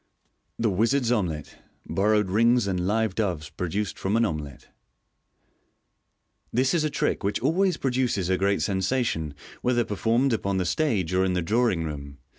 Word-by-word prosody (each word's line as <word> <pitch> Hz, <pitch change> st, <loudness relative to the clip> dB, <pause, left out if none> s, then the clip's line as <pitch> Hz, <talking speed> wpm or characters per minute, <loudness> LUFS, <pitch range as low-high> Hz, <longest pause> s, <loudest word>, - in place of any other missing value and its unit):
The 115 Hz, -2 st, +1 dB
Wizard's 115 Hz, +5 st, +1 dB
Omelet. 85 Hz, -10 st, -2 dB, 0.3 s
(Borrowed 105 Hz, +1 st, +2 dB
Rings 115 Hz, +2 st, +4 dB
and 90 Hz, -2 st, -1 dB
Live 110 Hz, -1 st, +1 dB
Doves 90 Hz, -8 st, -2 dB
produced 95 Hz, +3 st, -3 dB
from 100 Hz, +4 st, 0 dB
an 115 Hz, -, +3 dB
Omelet.) 75 Hz, -, -5 dB, 0.9 s
— -, -, -47 dB
This 130 Hz, +2 st, +2 dB
is 165 Hz, -3 st, +2 dB
a 155 Hz, -, +1 dB
trick -, -, -1 dB
which 100 Hz, +1 st, 0 dB
always 175 Hz, +6 st, +2 dB
pro 135 Hz, -, -1 dB
duces 125 Hz, -8 st, 0 dB
a 95 Hz, -, +2 dB
great 100 Hz, +1 st, +1 dB
sensation, 95 Hz, -, -1 dB, 0.3 s
whether 120 Hz, -1 st, +1 dB
performed 115 Hz, +5 st, +1 dB
upon 100 Hz, -3 st, -1 dB
the 90 Hz, -, 0 dB
stage 95 Hz, -, 0 dB
or 95 Hz, +1 st, +3 dB
in 95 Hz, -1 st, +1 dB
the 90 Hz, -1 st, 0 dB
drawing 110 Hz, -3 st, +1 dB
room. 70 Hz, -2 st, -6 dB
105 Hz, 165 wpm, -26 LUFS, 90-120 Hz, 0.9 s, Rings